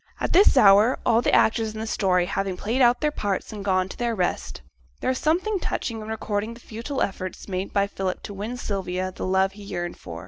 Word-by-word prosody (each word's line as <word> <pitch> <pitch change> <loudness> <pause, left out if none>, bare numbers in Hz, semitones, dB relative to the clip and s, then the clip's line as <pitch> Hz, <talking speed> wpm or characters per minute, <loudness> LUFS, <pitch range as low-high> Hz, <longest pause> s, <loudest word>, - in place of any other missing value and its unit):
At - - -1
this 375 -5 +6
hour, 210 +1 +6
all 230 0 +4
the - - +1
actors 220 -1 +2
in - - -5
this 220 0 -4
story 180 -3 +2
having 195 0 -2
played 235 +8 -1
out 245 0 +4
their 300 -1 +1
parts 205 -6 -3
and 205 -2 -6
gone 185 -2 +1
to - - -10
their 235 -2 -1
rest, 180 - -2 0.4
there - - 0
is 255 - -2
something 370 +6 +1
touching 230 -9 -3
in 215 - -8
recording 220 0 -3
the - - -13
futile 235 +5 -4
efforts 185 -2 -5
made 190 0 -3
by 200 -1 +2
Philip 195 -2 -4
to 205 - -7
win 215 +5 -5
from - - -8
Sylvia 185 -2 -2
the 185 - -5
love 190 +1 +2
he 205 +1 -12
yearned 175 -3 -5
for. 85 0 -8
205 Hz, 235 wpm, -24 LUFS, 190-235 Hz, 0.4 s, this